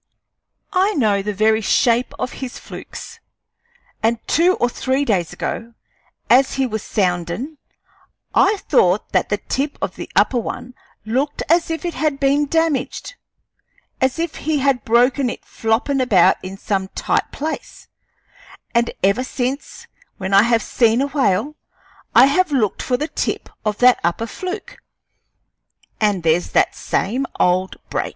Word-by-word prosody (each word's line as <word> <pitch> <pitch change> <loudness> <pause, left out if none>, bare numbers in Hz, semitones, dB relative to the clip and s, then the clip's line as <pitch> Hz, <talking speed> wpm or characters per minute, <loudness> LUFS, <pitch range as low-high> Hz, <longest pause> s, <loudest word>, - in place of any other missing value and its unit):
I 385 +3 +3
know 210 -7 +2
the 210 +2 -2
very 220 +2 +2
shape 235 +3 +2
of 250 - -3
his 255 -2 -5
flukes; - - -10 0.8
and 230 +1 +2
two 355 +4 +3
or 245 - +1
three 265 +3 -1
days 180 - 0
ago, 230 0 -5 0.5
as 260 +2 +4
he 270 -1 +1
was 220 -4 -3
soundin', 190 - -2 0.7
I 410 +2 +4
thought 190 - +2
that - - +1
the 205 - +1
tip 280 +7 -3
of - - -4
the - - -7
upper 250 - +3
one 245 +2 -6 0.3
looked 265 +6 -1
as 335 +1 +3
if 325 +2 -3
it 345 - -2
had 300 -3 -1
been 285 +1 +2
damaged 325 - -1 0.9
as 260 +2 +1
if 330 -1 -3
he 310 0 -1
had 275 -2 +1
broken 250 +3 +3
it - - -7
floppin' 240 +5 0
about 200 -9 +4
in 190 +1 -7
some 195 -1 -2
tight - - 0
place; 315 +3 -6 0.9
and 235 0 +2
ever 200 +6 +3
since, 260 +2 -4 0.3
when 190 +1 -4
I 195 - +8
have 230 0 +2
seen 230 0 +2
a - - 0
whale, 270 -1 +1 0.6
I 240 +3 +9
have 315 +5 +2
looked 230 -8 0
for 250 - 0
the 300 - -2
tip - - -3
of 210 -1 -1
that 250 0 +5
upper 170 +7 0
fluke, 385 - -6 1.2
and 205 -5 +1
there's 165 +2 +1
that - - +3
same 250 +8 -1
old 185 +1 +2 0.2
break. - - -1
250 Hz, 150 wpm, -20 LUFS, 210-285 Hz, 1.2 s, I